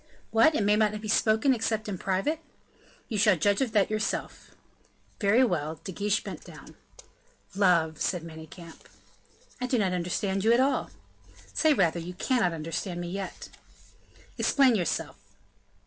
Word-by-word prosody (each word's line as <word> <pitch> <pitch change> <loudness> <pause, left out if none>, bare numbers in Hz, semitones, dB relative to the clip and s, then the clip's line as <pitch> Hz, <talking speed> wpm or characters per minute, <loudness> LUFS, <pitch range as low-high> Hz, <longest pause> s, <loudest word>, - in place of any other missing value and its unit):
"What! 230 +8 +5
may 210 -3 +2
it - - +3
not 215 -1 +1
be 215 - -7
spoken 220 +4 +3
except 220 -2 -2
in 195 -4 -4
private?" 195 +12 -1 0.7
"You 215 -4 -2
shall 205 -1 +5
judge 200 - +1
of 255 -4 0
that 210 -1 +2
yourself." 215 0 -3 0.6
"Very 220 +5 +4
well." 160 - -1
De 190 - -6
Guiche 205 +2 -1
bent - - -8
down. - - -13 0.8
"Love," 170 -5 +2
said 180 -3 -1
Manicamp. 165 +1 -12 0.7
"I 250 - -1
do 250 - +1
not 190 -4 +1
understand 190 +2 -1
you 225 +2 +5
at 235 - +4
all." 270 +2 +1 0.6
"Say 315 -2 +3
rather, 170 -5 +2
you 175 +2 -7
cannot 220 -2 +1
understand 165 +3 -4
me 175 0 -5
yet." 195 0 -6 0.9
"Explain 270 -3 +4
yourself." 180 -7 -2
200 Hz, 150 wpm, -27 LUFS, 175-225 Hz, 0.9 s, What